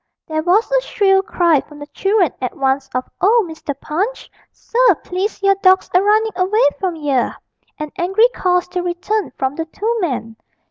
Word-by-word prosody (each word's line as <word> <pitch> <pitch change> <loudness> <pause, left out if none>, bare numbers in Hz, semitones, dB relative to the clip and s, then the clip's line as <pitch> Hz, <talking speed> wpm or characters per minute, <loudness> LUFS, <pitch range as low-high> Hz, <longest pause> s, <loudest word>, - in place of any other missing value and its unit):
There 315 0 -2
was 375 +9 +2
a - - +3
shrill 390 -5 +2
cry 345 -7 +2
from 295 - -15
the 290 - -8
children 390 - +1
at 250 - -4
once 270 0 0
of 255 - -2
'Oh, 435 +3 +4
Mr. 310 -3 -6
Punch, 390 +14 -3 0.2
sir, 475 -5 +2
please 385 +3 -3
your 395 0 +5
dawg's 375 0 +4
a 365 - +5
runnin' 430 +2 +2
away 380 +5 +1 0.2
from 370 -3 -2
yer!' 285 -5 -1 0.4
and 305 -1 -6
angry 385 +7 +4
calls 360 -1 +1
to 360 0 -2
return 360 +4 -2
from 265 0 -1
the 325 - -2
two 440 +8 -2
men. 235 -9 -3
360 Hz, 180 wpm, -18 LUFS, 305-415 Hz, 0.4 s, your